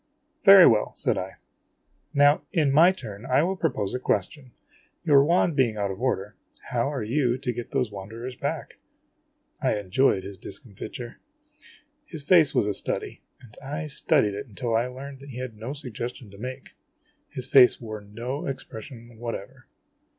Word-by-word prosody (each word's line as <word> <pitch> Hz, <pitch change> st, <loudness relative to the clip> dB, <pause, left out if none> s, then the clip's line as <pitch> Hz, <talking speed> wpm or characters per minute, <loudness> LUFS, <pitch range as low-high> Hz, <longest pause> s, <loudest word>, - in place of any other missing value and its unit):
" -, -, -46 dB
Very 190 Hz, -3 st, +11 dB
well," 110 Hz, -2 st, +3 dB
said -, -, 0 dB
I. 95 Hz, +1 st, -4 dB, 0.4 s
" -, -, -47 dB, 0.3 s
Now, 145 Hz, +1 st, +5 dB
in 155 Hz, -6 st, +2 dB
my 165 Hz, +6 st, +7 dB
turn, 110 Hz, -, -9 dB
I 130 Hz, +3 st, +2 dB
will 190 Hz, +3 st, 0 dB
propose 130 Hz, -, -1 dB
a 125 Hz, -, -2 dB
ques 100 Hz, -6 st, +1 dB
tion. 135 Hz, -5 st, -15 dB, 0.5 s
Your 140 Hz, -3 st, +6 dB
wand 170 Hz, +1 st, +2 dB
being 120 Hz, -6 st, +2 dB
out 100 Hz, -1 st, -1 dB
of 95 Hz, +4 st, -8 dB
order, 105 Hz, -5 st, -1 dB, 0.4 s
how 125 Hz, +3 st, 0 dB
are 135 Hz, -6 st, -3 dB
you 125 Hz, +2 st, +1 dB
to 130 Hz, -2 st, -3 dB
get 120 Hz, 0 st, -6 dB
those 125 Hz, -5 st, -1 dB
wan 100 Hz, -1 st, -8 dB
derers 120 Hz, +3 st, -7 dB
back? -, -, -4 dB, 0.4 s
' -, -, -41 dB
I -, -, +1 dB
enjoyed 100 Hz, +1 st, +2 dB
his 100 Hz, -2 st, -9 dB
discomfiture. 115 Hz, +4 st, -7 dB, 0.8 s
His 160 Hz, -, -7 dB
face 160 Hz, -2 st, +5 dB
was -, -, +3 dB
a 105 Hz, -, 0 dB
study, -, -, -3 dB, 0.2 s
and 120 Hz, -4 st, -16 dB
I 150 Hz, +3 st, -4 dB
studied 135 Hz, -7 st, +2 dB
it 105 Hz, +4 st, -6 dB
until 115 Hz, +1 st, -3 dB
I 115 Hz, +2 st, +2 dB
learned 135 Hz, +2 st, -9 dB
that 140 Hz, +1 st, -12 dB
he 125 Hz, -, -8 dB
had 125 Hz, -3 st, -5 dB
no 110 Hz, +5 st, -6 dB
suggestion 125 Hz, -5 st, -6 dB
to 100 Hz, -, -13 dB
make. 130 Hz, +3 st, -7 dB, 0.6 s
His 130 Hz, -3 st, -5 dB
face 130 Hz, -2 st, +6 dB
wore 110 Hz, -3 st, -7 dB
no 120 Hz, +7 st, -5 dB
expression 120 Hz, -3 st, -8 dB
whatever. 120 Hz, +2 st, -7 dB
125 Hz, 180 wpm, -26 LUFS, 110-140 Hz, 0.8 s, Very